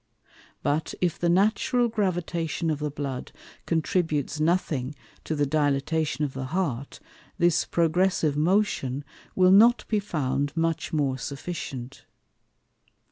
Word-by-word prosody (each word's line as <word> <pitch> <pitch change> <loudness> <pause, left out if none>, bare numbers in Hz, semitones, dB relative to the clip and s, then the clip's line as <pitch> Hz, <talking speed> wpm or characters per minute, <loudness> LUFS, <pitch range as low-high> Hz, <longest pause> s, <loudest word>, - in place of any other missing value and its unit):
But, 145 +2 -1
if 175 -3 0
the 170 - +1
natural 220 +6 +3
Gravitation 175 -6 -1
of 150 - -2
the 150 0 -2
Blood 140 -3 -5 0.4
contributes 160 -3 0
nothing 155 -5 0 0.3
to 160 - -2
the 145 -1 +1
Dilatation 145 0 0
of 135 - -5
the 130 0 -4
Heart, 140 -4 -3 0.4
this 175 -2 +3
progressive 170 -2 +1
Motion 150 -5 +1 0.3
will 185 0 +5
not 230 +5 +6
be 215 - +1
found 145 -6 -2
much 165 -1 0
more 140 -4 0
sufficient. 135 -2 -6
155 Hz, 120 wpm, -26 LUFS, 140-180 Hz, 0.4 s, not